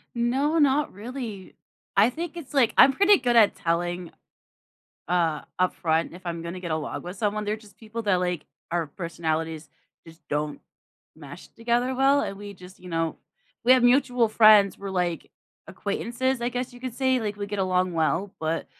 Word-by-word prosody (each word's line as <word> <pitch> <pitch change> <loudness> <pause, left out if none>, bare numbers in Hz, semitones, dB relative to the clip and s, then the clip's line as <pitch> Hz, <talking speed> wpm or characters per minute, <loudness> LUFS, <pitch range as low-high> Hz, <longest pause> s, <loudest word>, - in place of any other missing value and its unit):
No, 270 +7 +1
not 290 0 +2
really. 220 -2 -7 0.4
I 210 +4 +6
think 335 +5 -6
it's, 310 -5 -9
like 260 -5 +3
I'm 270 0 +8
pretty 400 +7 +5
good 245 -2 0
at 220 -3 +6
telling, 175 +1 -2 1.0
uh, 165 -3 +1 0.2
upfront 165 -3 +1
if 180 - -12
I'm 170 -1 -4
gonna 170 +2 -6
get 175 -2 -6
along 155 -1 -3
with 180 +2 -7
someone, 210 +1 -1
they're 210 +1 -1
just 210 -3 -18
people 225 +1 -6
that, 200 -4 +2
like 180 -3 -2 0.3
our 170 -1 -1
personalities 160 -1 -4 0.4
just 165 -1 -16
don't 150 0 -2 0.6
mesh - - -11
together 240 +2 -1
well, 275 +2 +4
and 195 - -4
we 205 0 -8
just 180 0 -14
you 180 - -12
know, 165 -1 -1 0.5
we 250 - +7
have 255 -1 +5
mutual 245 -1 +3
friends, 215 -3 +6
we're, 195 0 -6
like, 180 -3 -2 0.4
acquaintances, 260 +2 -2
I 240 - 0
guess 250 +1 -4
you 245 - -13
could 255 -3 -5
say, 260 0 +1
like 210 -2 -3
we 205 -1 -4
get 205 0 -5
along 185 -1 +1
well, 165 +4 0
but 160 +1 -2
205 Hz, 180 wpm, -25 LUFS, 175-245 Hz, 1.0 s, I'm